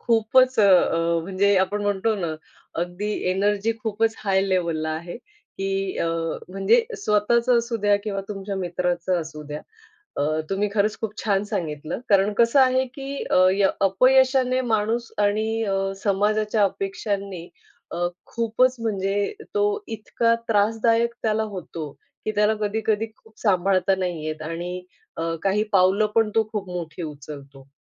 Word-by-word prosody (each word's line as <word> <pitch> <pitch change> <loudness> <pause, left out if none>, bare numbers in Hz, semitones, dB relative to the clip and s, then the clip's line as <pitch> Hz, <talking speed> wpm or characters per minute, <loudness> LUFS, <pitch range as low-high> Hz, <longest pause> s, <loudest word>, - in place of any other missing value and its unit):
खूपच 245 +3 +3
अ, 205 - +6 0.6
म्हणजे 195 +2 +2
आपण 205 +2 0
म्हणतो 205 +2 +1
ना, 170 -5 -3 0.5
अगदी 180 +4 -4 0.2
एनर्जी 205 +3 +1
खूपच 220 0 0
हाय 195 -2 +1
लेव्हलला 170 -4 0
आहे, 165 +2 -5
की 195 - -5
अ, - - 0 0.4
म्हणजे 195 - +3
स्वतःच 235 - +1
असू 235 -1 +2
द्या 205 -1 +3
किंवा 200 -2 -2
तुमच्या 195 -1 -5
मित्राचं 180 0 -1
असू 155 -1 -8
द्या. 150 0 -5 0.6
अ, 145 - +1 0.3
तुम्ही 200 +2 0
खरंच 210 0 +1
खूप 220 -2 -3
छान 200 -2 +1
सांगितलं 155 +2 -3
कारण 200 +1 +4
कसं 235 +4 +4
आहे, 260 0 +4
की 275 +1 -5
अ, 185 0 +5
य 195 0 +3 0.2
अपयशाने 260 +3 +4
माणूस 225 +2 0
आणि 220 +2 0
अ, 195 -2 0 0.3
समाजाच्या 210 +1 +1
अपेक्षांनी 195 -2 -3 0.4
अ, 175 +1 -1 0.2
खूपच 235 +3 +1
म्हणजे 200 - -1 0.2
तो 415 - +3 0.2
इतका 230 +1 0
त्रासदायक 225 +2 +2
त्याला 220 0 +1
होतो, 165 -5 -6 0.3
की 215 - 0
त्याला 210 +1 +3
कधी-कधी 215 +1 0
खूप 220 - -23
सांभाळता 190 -1 +2
नाही 175 -4 -3
येत 155 0 -4
आणि 175 +3 -5 0.3
अ, 165 - -2 0.2
काही 200 +2 +2
पावलं 195 +2 +4
पण 225 -1 +3
तो 225 - +4
खूप 200 -4 -4
मोठी 175 -1 -5
उचलतो. 140 -2 -10
205 Hz, 140 wpm, -23 LUFS, 185-225 Hz, 0.6 s, अ